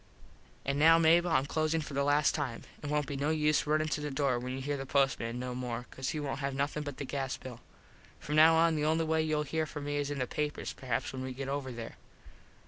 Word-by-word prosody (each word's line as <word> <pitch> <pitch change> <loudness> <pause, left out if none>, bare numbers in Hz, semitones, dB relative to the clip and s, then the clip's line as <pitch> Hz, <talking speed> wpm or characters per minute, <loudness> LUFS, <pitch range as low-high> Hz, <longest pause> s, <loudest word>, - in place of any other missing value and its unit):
An 140 +1 0
now, 165 +2 +7
Mable, 165 +2 +5
Im 135 -4 +2
closin 155 +2 0
for 150 -2 -6
the 140 0 +1
last 145 +1 +3
time. 135 -6 -3 0.2
It 145 - -5
wont 150 0 +1
be 140 - -5
no 140 +2 0
use 150 -1 +2
runin 155 +1 +2
to 150 - -1
the 150 - -3
door 135 -3 +1
when 125 +1 -5
you 130 - -4
here 145 +2 -2
the 135 - -4
postman 130 -4 +1
no 125 0 -4
more 125 -1 -4
cause 130 0 -4
he 155 - -2
wont 145 -1 -3
have 140 -1 -2
nothin 145 +2 -1
but 145 -3 -6
the 140 - -4
gas 135 0 -3
bill. 125 -3 -9 0.6
From 150 - -3
now 160 +1 +7
on 165 0 +4
the 150 - -1
only 160 +1 +2
way 160 0 +2
youll 155 -1 0
here 155 +2 -1
from 150 -1 -6
me 145 0 -2
is 145 -1 -1
in 145 - -3
the 130 - 0
papers 150 +3 -3
perhaps 125 -2 -3
when 130 - -5
we 130 0 -4
get 135 +1 -5
over 140 -2 -3
there. 115 -1 -7
145 Hz, 255 wpm, -31 LUFS, 135-155 Hz, 0.6 s, now